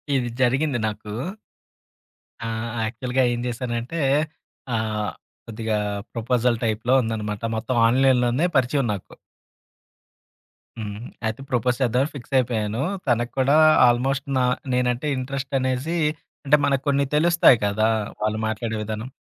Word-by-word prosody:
ఇది 120 -2 0
జరిగింది 130 +1 +2
నాకు. 105 0 -6 1.3
ఆహ్, 115 +1 -3 0.2
యాక్చువల్‌గా 125 +3 -1
ఏం 120 - -3
జేశానంటే, 120 +5 -3 0.8
ఆహ్, 110 -1 -1 0.3
కొద్దిగా 110 -1 -2 0.4
ప్రపోజల్ 120 0 +1
టైప్‌లో 115 +3 0
ఉందన్నమాట. 110 -1 -3
మొత్తం 120 +3 -2
ఆన్‌లైన్‌లోనే 130 +3 +3
పరిచయం 130 0 +1
నాకు. 100 - -8 1.7
హ్మ్. 105 -1 -5 0.3
అయితే 110 +4 -2
ప్రపోజ్ 125 -1 +1
చేద్దామని 130 +4 +2
ఫిక్స్ 135 +1 -9
అయిపోయాను. 115 -2 0 0.3
తనకి 120 0 +1
కూడా 140 +3 +4 0.3
ఆల్మోస్ట్ 135 +3 +1
నా 125 - +3 0.3
నేనంటే 125 +3 0
ఇంట్రెస్ట్ 135 +1 -4
అనేసి, 130 +6 -1 0.5
అంటే 150 +2 +5
మనకు 135 -1 +1
కొన్ని 140 0 +2
తెలుస్తాయి 170 -5 +5
కదా! 110 +2 +2 0.3
వాళ్ళు 110 0 0
మాట్లాడే 110 0 -3
విధానం. 110 +4 -5
120 Hz, 115 wpm, -23 LUFS, 110-130 Hz, 1.7 s, అంటే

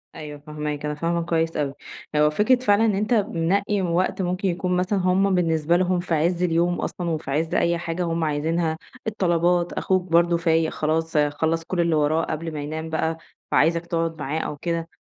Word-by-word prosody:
أيوه 150 -1 -8
فاهماك، 150 0 -5
أنا 150 0 -2
فاهمة 170 +2 -1
كويس 165 -1 0
أوي، 140 -2 -1 0.4
هو 150 0 +5
فكرة 210 +11 +3
فعلًا 215 -2 +3
إن 210 -3 +2
أنت 210 +4 0
منقّي 200 0 +1
وقت 180 +2 0
ممكن 180 +2 -1
يكون 180 0 0
مثلًا 190 +2 0
هُم 185 +1 +2
بالنسبة 165 -1 +2
لهم 180 0 +1
في 175 -1 -3
عز 170 +3 +1
اليوم 175 0 +1
أصلًا 175 -2 -3
وفي 155 -4 -3
عز 160 +3 -1
أي 170 0 +2
حاجة 170 +1 -3
هُم 165 -1 -1
عايزينها، 160 +2 0 0.3
الطلبات، 175 -4 +1
أخوك 185 -1 +1
برضه 170 0 +4
فايق 165 -1 +1
خلاص 160 +1 -1
خلّص 160 +3 +1
كلّ 180 +2 -4
اللي 170 -1 +2
وراه 155 +2 +2
قبل 160 +1 -4
ما 150 - -4
ينام 155 +2 -5
بقى، 160 0 -1 0.3
فعايزك 165 +2 +3
تقعُد 165 -1 -2
معاه 145 +3 -2
أو 150 - -4
كده، 165 +1 -3
165 Hz, 190 wpm, -23 LUFS, 160-180 Hz, 0.4 s, هو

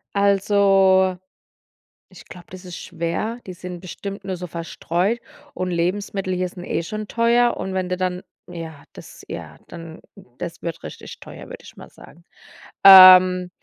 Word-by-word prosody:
Also, 195 -2 +3 0.9
ich - - -16
glaube, 180 -1 -13
das 185 0 -11
ist 180 -2 -8
schwer, 190 +8 -4
die 185 - -7
sind 180 0 -9
bestimmt 195 +3 -8
nur 190 -2 -5
so 180 - -7
verstreut, 170 +6 -3 0.3
und 185 0 -4
Lebensmittel 185 +2 -2
hier 180 0 -2
sind 175 0 -11
eh 165 - -3
schon 215 +4 -6
teuer, 235 +1 +1
und 190 - -5
wenn 185 -1 -3
du 180 - -2
dann, 185 0 -3 0.3
ja, 165 -4 -9
das - - -14
ja, - - -9
dann 165 -1 -11 0.4
das 170 - -7
wird 165 -1 -6
richtig - - -10
teuer, - - -12
würde - - -11
ich - - -15
mal - - -13
sagen. 170 +2 -18 0.6
Ähm, 185 -1 +9
185 Hz, 160 wpm, -21 LUFS, 175-195 Hz, 0.9 s, Ähm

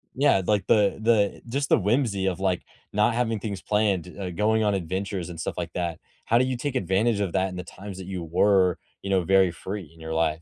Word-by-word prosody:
yeah, 140 -7 +4
like, 105 -2 +1
the 105 -2 +3
the 110 -3 +2
just 140 +3 -1
the - - +5
whimsy 105 -2 +1
of, 95 0 -1
like, 95 -2 0 0.3
not 105 +2 +3
having 115 -3 0
things 100 -3 -5
planned, 105 -5 +1
uh, 95 -2 -3
going 110 +4 +2
on 105 -1 +2
adventures, 95 0 -3
and 85 -2 -8
stuff - - -3
like 85 -1 -3
that. 85 -2 -3 0.3
How 115 - +3
do 130 - +4
you 130 -1 -2
take 135 +2 -3
advantage 100 +1 +1
of 95 -4 -2
that 95 0 +1
in 90 - -8
the 90 - -5
times 95 +2 -9
that 95 - -7
you 90 -3 -4
were, 90 +2 +3 0.2
you 100 - -5
know, 95 -2 +2
very 95 0 +4
free 95 0 -6
in 80 - -19
your 80 0 -5
life? 80 -1 0
95 Hz, 235 wpm, -25 LUFS, 90-105 Hz, 0.3 s, the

